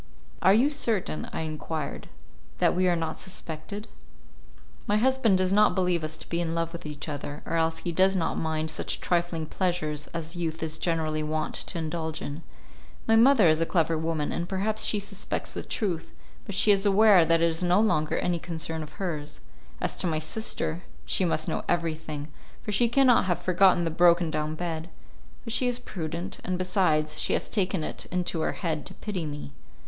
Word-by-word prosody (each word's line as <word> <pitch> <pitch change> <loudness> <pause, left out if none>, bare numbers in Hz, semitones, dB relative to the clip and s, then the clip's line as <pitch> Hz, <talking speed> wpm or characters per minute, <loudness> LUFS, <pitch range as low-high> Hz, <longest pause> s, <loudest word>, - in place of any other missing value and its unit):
"Are 195 - +6
you 265 +7 +4
certain," 225 - -2
I - - -3
enquired, 155 -1 -4 0.5
"that - - +3
we 185 +1 +2
are 175 - +3
not 160 -1 -3
suspected?" 190 +3 -6 1.0
"My 210 - +3
husband 245 -4 +3
does 185 0 +1
not 210 +1 +5
believe 180 -3 +1
us 155 +1 -4
to - - -10
be 170 0 -1
in 165 -1 -2
love 165 0 -1
with 170 -2 -7
each 150 0 -7
other, 145 0 -5
or - - -4
else 160 0 +1
he 175 - -3
does 190 +3 +3
not 170 -3 0
mind 160 0 -1
such - - -2
trifling 170 -2 0
pleasures 155 -4 -2
as 165 +1 -5
youth 165 -2 -3
is 160 0 -3
generally 160 -2 0
wont 155 0 -2
to 185 - -2
indulge 160 -1 -3
in. 145 +3 -6 0.7
My 225 - +5
mother 230 -4 +6
is 155 0 +3
a - - +3
clever 165 -2 +2
woman, 160 -1 -1
and 170 +1 -3
perhaps 210 +3 0
she 210 - +1
suspects 200 0 -4
the - - -4
truth, 180 -8 -3 0.4
but 200 - -3
she 205 +2 +5
is 195 -1 +3
aware 205 -2 +6
that 165 0 +3
it - - +6
is 160 - -4
no 180 +2 +4
longer 155 -9 +2
any 175 -1 0
concern 160 -1 -4
of 150 - -8
hers. 155 -6 -4 0.4
As - - -1
to - - 0
my 160 -2 0
sister, 165 0 -2 0.2
she 185 - +1
must 165 -2 +1
know - - -2
everything, 160 -3 -2 0.4
for 210 - -3
she 235 +3 +3
cannot 255 -2 +5
have 175 -2 +1
forgotten 185 0 +4
the 165 - -1
broken 170 0 +4
down 155 0 -2
bed; 165 -1 -4 0.5
but 230 - -5
she 250 - +2
is 245 -1 0
prudent, 170 -5 -5
and 185 0 -1
besides, 160 -5 +1
she - - +1
has - - 0
taken 190 -5 0
it - - -4
into 180 -2 -1
her - - 0
head 160 -5 -3
to 190 - -6
pity 190 -6 -4
me. 145 -1 -7
170 Hz, 195 wpm, -27 LUFS, 160-190 Hz, 1.0 s, Are